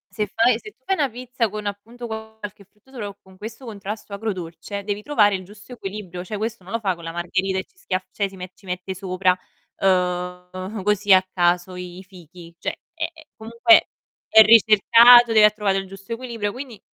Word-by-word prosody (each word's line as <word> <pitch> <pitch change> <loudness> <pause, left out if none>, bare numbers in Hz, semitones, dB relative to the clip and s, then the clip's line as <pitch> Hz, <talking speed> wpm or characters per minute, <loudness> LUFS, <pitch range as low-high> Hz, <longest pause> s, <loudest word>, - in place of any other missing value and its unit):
Se 210 -2 -1
fai 230 0 +4
se 425 - -10
tu - - -43
fai 385 - +2
una 285 -5 0
pizza 245 -1 -3
con 210 0 -7
appunto 225 +4 -7
qualche 220 -2 -8
frutto, 210 +6 -28
solo 205 -6 -7
con 190 0 -18
questo 225 +5 -9
contrasto 210 -1 -7
agrodolce, 195 -1 -5
devi 205 0 -3
trovare 210 -7 +3
il 185 - -6
giusto 205 +5 -14
equilibrio, 190 -5 -7
cioè 210 +3 -6
questo 220 -2 -4
non 190 - -12
lo 230 - -1
fa 195 -4 0
con 170 - -14
la 165 - -5
margherita 190 +2 -2
e 190 - -2
ci 375 - -38
schiaff 185 - -3
cioè, 200 -2 -2
si 190 - -14
met 185 0 -8
ci 195 - -22
mette 180 +1 -4
sopra, 185 0 0 0.4
ehm 180 +1 -2
così 205 0 +1
a 185 0 +5
caso 175 +1 +1
i 180 +1 -8
fichi. 175 -2 -14
Cioè, - - -4 0.2
eh, 330 0 -4
eh, 320 -2 -18
comunque 235 +10 +4 0.4
è 220 - +8
ricercato, 230 +2 +7
deve 225 -1 +3
aver 210 - +4
trovato 200 -2 0
il 195 - -7
giusto 195 +4 -9
equilibrio, 230 -4 -4
quindi 250 -3 -9
205 Hz, 200 wpm, -22 LUFS, 185-225 Hz, 0.4 s, è